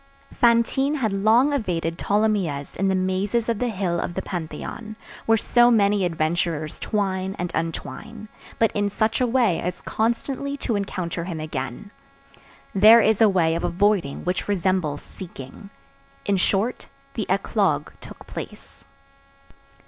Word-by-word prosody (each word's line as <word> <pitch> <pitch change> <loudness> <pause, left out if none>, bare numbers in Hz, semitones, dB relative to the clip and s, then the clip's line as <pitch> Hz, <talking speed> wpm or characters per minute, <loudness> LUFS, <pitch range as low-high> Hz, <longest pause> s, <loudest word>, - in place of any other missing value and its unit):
Fantine 240 +4 +3
had 225 -8 -1
long 225 +8 +4
evaded 170 -9 -2
Tholomyès 200 -9 0
in 195 - 0
the 190 - +2
mazes 190 +5 0
of 230 -3 0
the 250 - 0
hill 185 -5 -1
of 175 - -4
the - - -3
Pantheon, 180 +6 -6 0.3
where 225 0 +5
so 240 +2 +4
many 205 -3 +3
adventurers 160 -1 -1
twine 190 -2 -1
and 175 -1 -3
untwine, 165 - -5 0.3
but 225 - +3
in 205 0 0
such 220 +4 0
a 250 - +3
way 235 -7 +2
as 180 +1 -4
constantly 260 +5 -1
to 235 -5 -2
encounter 180 -4 -3
him 170 -3 -5
again. 155 - -5 0.8
There 215 +4 +8
is 220 -1 +2
a 220 - +7
way 170 -4 +2
of 165 - -2
avoiding 180 -6 +1
which 180 0 -1
resembles 185 -6 0
seeking. 175 +1 -10 0.6
In 200 -1 +2
short, 200 +6 0 0.3
the 220 - -3
eclogue 190 -5 +1
took - - -12
place. - - -9
195 Hz, 140 wpm, -23 LUFS, 170-220 Hz, 0.8 s, There